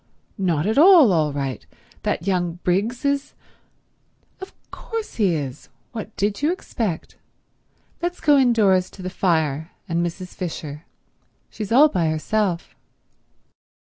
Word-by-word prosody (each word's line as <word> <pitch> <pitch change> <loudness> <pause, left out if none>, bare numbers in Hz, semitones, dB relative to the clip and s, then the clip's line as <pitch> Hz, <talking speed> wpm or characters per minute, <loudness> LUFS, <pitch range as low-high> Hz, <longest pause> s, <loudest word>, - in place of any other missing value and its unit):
"Not 170 -5 +1
at 220 +6 +2
all 325 - +8
all 155 -3 +2
right. 140 -2 -4 0.4
That 170 - -2
young 180 -3 0
Briggs 210 +9 0
is—" 280 0 -1 1.0
"Of 380 - -9 0.2
course 455 -1 -6
he 195 -7 +2
is. 135 -4 -6 0.2
What 220 -2 -7
did 205 +3 -1
you 300 +3 +2
expect? 220 - -4 0.8
Let's 350 +1 -2
go 295 -2 +4
indoors 215 -8 +3
to 190 - -9
the 185 - -4
fire 160 -4 0
and 170 -1 0
Mrs. 180 +2 -5
Fisher. 155 -4 -6 0.7
She's 215 -2 -6
all 275 +6 +7
by 180 - 0
herself." 175 +3 -1
190 Hz, 130 wpm, -22 LUFS, 165-240 Hz, 1.0 s, all